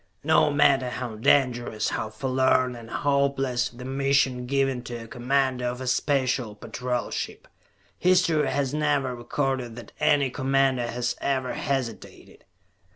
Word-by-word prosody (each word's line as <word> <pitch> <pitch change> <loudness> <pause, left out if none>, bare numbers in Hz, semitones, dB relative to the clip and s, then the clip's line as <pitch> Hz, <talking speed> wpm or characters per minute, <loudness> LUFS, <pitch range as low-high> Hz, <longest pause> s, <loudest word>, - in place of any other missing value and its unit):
No 155 0 +4
matter 135 -3 +3
how 125 -2 -5
dangerous, 120 -2 +2
how 110 - -3
forlorn 130 +2 +1
and 115 -1 -11
hopeless 140 -3 0
the 125 +1 -11
mission 135 -2 +1
given 135 -1 0
to 120 -1 -6
a - - -11
commander 130 0 0
of 125 +1 -3
a 130 - -5
Special 130 -4 0
Patrol 125 +3 -4
ship, - - -5 0.5
history 175 -5 +3
has 140 -1 -1
never 145 -4 0
recorded 125 -1 -2
that 120 - -10
any 145 -3 +3
commander 135 -2 +1
has 120 +1 -2
ever 130 -2 -1
hesitated. 130 -5 -5
130 Hz, 135 wpm, -25 LUFS, 120-140 Hz, 0.5 s, No